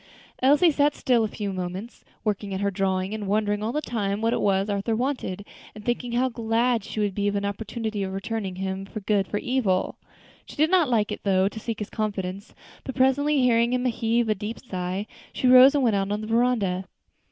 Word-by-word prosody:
Elsie 290 +6 +5
sat 290 0 +2
still 240 -3 +2
a - - +1
few 205 -2 -4
moments, 185 +5 -6 0.2
working 205 -2 -2
at - - -3
her 200 0 0
drawing 190 0 -1
and 215 -2 -4
wondering 205 0 0
all 220 +2 -1
the 300 - -1
time 205 -3 -2
what 225 +1 +1
it - - 0
was 195 0 +2
Arthur 205 +2 -1
wanted, 235 -6 -2 0.3
and 210 0 -11
thinking 240 0 -2
how 250 +2 +2
glad 230 -1 0
she 215 - -6
would 205 -2 0
be 205 +1 -1
of 205 - 0
an 200 0 -1
opportunity 215 +1 -3
of 190 -1 -2
returning 195 0 -4
him 190 +1 -4 0.2
good 200 -2 +2
for 205 - -2
evil. 210 -6 0 0.5
She - - -11
did 310 +3 +2
not 350 -7 +4
like, 220 -4 +1
though, 190 -1 +3
to 215 +2 -5
seek 225 0 -4
his 210 - -6
confidence, 200 -2 -4 0.3
but 265 - -6
presently 275 +2 +3
hearing 235 -1 +3
him 250 0 0
heave 230 -1 +1
a 215 - +3
deep 210 +3 -6
sigh, 185 -2 -4 0.3
she - - -3
rose 255 +3 +8
and 280 - +2
went 225 -4 +3
out 195 0 -1
on 210 +1 -1
the - - -5
veranda. 225 -5 +1
215 Hz, 210 wpm, -25 LUFS, 195-245 Hz, 0.5 s, rose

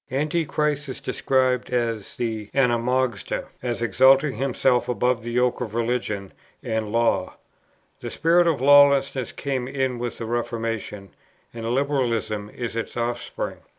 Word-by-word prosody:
Antichrist 150 0 -1
is 130 - -5
described 130 -2 0
as 115 -4 -2
the 110 -3 -3
[Greek: - - -25
anomos], 125 -3 0 0.2
as 120 -1 -2
exalting 130 +4 +4
himself 130 -1 +1
above 125 0 +1
the 120 - -6
yoke 125 0 +1
of 115 -3 -4
religion 115 -5 -2 0.3
and 110 -1 -2
law. 115 -5 +1 0.6
The - - -6
spirit 170 +1 +3
of 155 -6 +1
lawlessness 140 -2 +5
came 130 -3 -3
in 130 -2 -2
with 120 0 -4
the 115 - -5
Reformation, 115 -4 -3 0.4
and 115 -1 -5
Liberalism 120 -6 -1
is 120 0 -5
its 115 +1 -4
offspring. 120 0 -3
125 Hz, 135 wpm, -24 LUFS, 115-135 Hz, 0.6 s, lawlessness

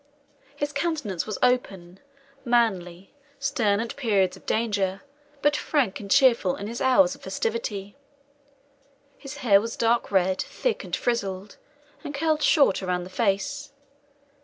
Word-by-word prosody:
His 290 0 -3
countenance 280 - -2
was 215 - -3
open, 195 -8 0 0.4
manly, 195 -7 0 0.2
stern 235 -8 +1
at 230 0 -4
periods 205 -9 +1
of - - -18
danger, 200 -4 -1 0.4
but 295 0 +3
frank 275 -10 0
and 200 - -9
cheerful 235 -8 +4
in 200 - -7
his 230 +3 -5
hours 265 +1 +4
of 280 - -14
festivity. 205 -3 -3 1.2
His 275 0 -9
hair 200 -3 +6
was 230 +1 -5
dark 235 +1 +1
red, 190 -1 +2
thick, - - -2
and - - -3
frizzled, 200 -4 -3 0.5
and 290 - -6
curled 310 +1 +1
short 280 - +4
around 180 -1 -2
the 185 - -10
face. 235 +8 -1
225 Hz, 135 wpm, -25 LUFS, 195-275 Hz, 1.2 s, hair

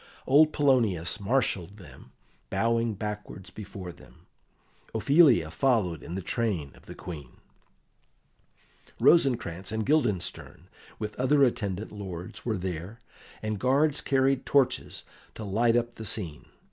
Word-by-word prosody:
Old 150 +3 +5
Polonius 115 - +2
marshalled 100 -4 -1
them, 90 - -14 0.4
bowing 115 -1 +1
backwards 105 -3 -6
before 95 -2 -8
them; - - -18 0.7
Ophelia 130 - +5
followed 95 - +1
in 85 - -7
the 95 - -4
train 90 -11 -1
of - - -20
the - - -9
Queen; 75 -8 -9 1.6
Rosencrantz 115 - +3
and 110 -1 -2
Guildenstern, 105 - -1 0.3
with 105 -1 -5
other 140 +3 +3
attendant 105 -5 -1
lords, 95 -4 -7
were 110 -3 -1
there, 90 +3 -5 0.5
and 110 -2 -2
guards 140 +5 +2
carried 135 -1 +2
torches 140 -3 +1 0.3
to 110 - -7
light 115 +4 +2
up 120 0 0
the 110 - -7
scene. 85 -9 -3
110 Hz, 120 wpm, -28 LUFS, 90-130 Hz, 1.6 s, Old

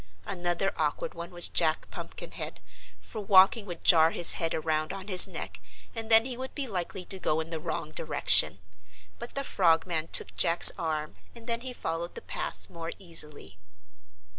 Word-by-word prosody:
Another 175 +1 -2
awkward 150 -2 -3
one 170 0 -8
was 175 -1 +2
Jack 160 -2 +1
Pumpkinhead, - - -8 0.4
for 220 - -9
walking 200 +2 +4
would 175 -2 -8
jar 160 -2 +5
his 170 0 +4
head 165 -1 -2
around 155 -1 -2
on 195 0 -8
his 185 -1 +8
neck 95 - -8 0.3
and 225 0 -7
then 225 0 +5
he 255 -2 -4
would 260 +2 -8
be 285 - -2
likely 185 -3 -5
to 190 - -1
go 155 -3 -1
in 160 +1 -6
the 165 - -4
wrong 155 0 -6
direction. 145 - +4 0.6
But 235 - -8
the 275 - 0
Frogman 165 - 0
took - - +1
Jack's 170 -1 +6
arm 155 -3 -5 0.2
and 230 -1 -12
then 230 0 -1
he 255 0 -5
followed 170 -6 -5
the - - -8
path - - -6
more 165 -2 -8
easily. 150 - -3
175 Hz, 175 wpm, -27 LUFS, 160-195 Hz, 0.6 s, his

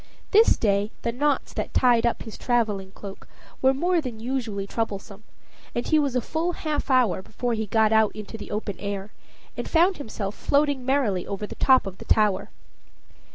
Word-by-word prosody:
This 440 +2 +6
day 205 -1 +1
the 235 - 0
knots 280 +3 0
that - - -4
tied 240 -2 +4
up 235 - -2
his 220 - -9
traveling 215 -6 0
cloak 195 0 -10 0.3
were 265 - +5
more 345 +5 +1
than 245 -6 -6
usually 230 -5 -3
troublesome, 200 -1 -4 0.5
and 240 - -1
he 310 - +3
was 280 -4 0
a 250 - +2
full 330 +7 -2
half 305 -3 -3
hour 250 -8 +3
before 240 +5 -3
he 220 -1 -2
got 220 +1 +3
out 220 -1 +4
into 215 +1 -8
the 220 - -8
open 210 -2 -4
air, 200 0 -4 0.4
and - - -5
found 350 +3 +3
himself 215 -6 -5
floating 285 0 +1
merrily 240 -10 +1
over 200 +1 -4
the - - -8
top 260 -3 +4
of 190 -1 -7
the - - -10
tower. 210 -3 +2
230 Hz, 185 wpm, -25 LUFS, 205-270 Hz, 0.5 s, This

